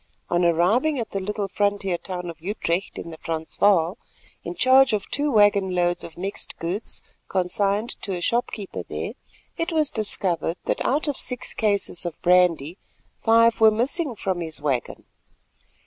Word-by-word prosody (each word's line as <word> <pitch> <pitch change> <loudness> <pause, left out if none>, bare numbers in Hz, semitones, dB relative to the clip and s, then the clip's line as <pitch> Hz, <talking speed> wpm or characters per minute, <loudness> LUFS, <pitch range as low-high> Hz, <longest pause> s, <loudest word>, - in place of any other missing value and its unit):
On 175 0 +2
arriving 195 - +3
at 230 - -4
the 195 - -2
little 200 +1 -3
frontier 200 -2 0
town 180 0 -5
of 165 -1 -16
Utrecht 185 -1 -2
in 170 - -6
the 160 - -9
Transvaal, 165 +4 +1 0.4
in - - -5
charge 260 -3 +5
of 205 -2 -1
two 295 +1 0
waggon 205 -4 +4
loads 175 0 +1
of 165 - -10
mixed 195 +3 -5
goods 180 +6 -2 0.2
consigned 200 +4 0
to 195 - -3
a - - -4
storekeeper 230 -3 -1
there, - - -5 0.5
it 330 +1 -1
was 310 -3 +1
discovered 185 -5 -1
that - - -1
out 295 +4 +1
of 285 - -1
six 250 -1 -2
cases 205 -5 0
of 175 -3 -5
brandy 180 -2 +3 0.4
five 230 0 +4
were 220 - +9
missing 250 +5 -1
from 190 -3 -2
his 160 -2 -2
waggon. 140 -5 -2
200 Hz, 160 wpm, -24 LUFS, 175-225 Hz, 0.5 s, were